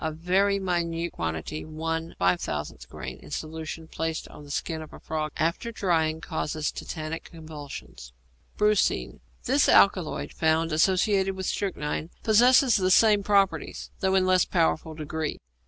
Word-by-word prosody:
A 160 - -1
very 185 +5 +2
minute 170 -3 -1
quantity 80 - -4
(1/5000 155 - -2
grain) - - -7
in - - -14
solution 160 +1 -5
placed 160 0 -3
on 150 - -12
the 145 - -13
skin 160 +2 -3
of 155 - -11
a - - -10
frog 155 -1 -3
after 170 +9 -1
drying 160 -6 0
causes 155 -1 -2
tetanic 160 0 -6
convulsions. 145 - -10 0.5
=Brucine.= 210 -1 +1 0.2
This 270 +3 +3
alkaloid, 185 -5 +3
found 160 +1 +1
associated 190 +4 +2
with 190 0 -4
strychnine, 160 -5 -2
possesses 245 +3 +5
the 185 -2 +1
same 210 +2 +5
properties, 200 -1 +1
though 190 -1 +1
in 190 - +4
a - - 0
less 185 -1 +4
powerful 160 -2 0
degree. 155 0 -3
165 Hz, 140 wpm, -26 LUFS, 155-190 Hz, 0.5 s, possesses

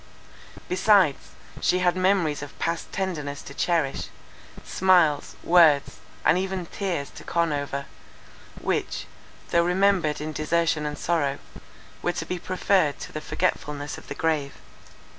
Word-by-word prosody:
Besides, 185 -5 +3 0.3
she 180 - +3
had 180 -1 +2
memories 185 -6 +2
of 145 -1 -9
past 165 0 -2
tenderness 150 -7 -3
to 140 - -10
cherish, 160 -3 0 0.6
smiles, 175 -6 +3
words, 160 -5 +5 0.3
and 180 - +5
even 190 -1 -3
tears, 170 -6 -3
to 155 - -11
con 170 -2 0
over, 140 -1 -3 0.7
which, - - -2 0.5
though 170 - +4
remembered 180 -3 +2
in 155 +1 -4
desertion 155 0 0
and 150 0 -4
sorrow, 145 -5 0 0.6
were 175 - 0
to - - -4
be 180 - -3
preferred 185 -4 +1
to - - -7
the 155 - -5
forgetfulness 145 -1 -2
of - - -17
the 140 - -6
grave. 150 -3 0
165 Hz, 135 wpm, -25 LUFS, 145-180 Hz, 0.7 s, words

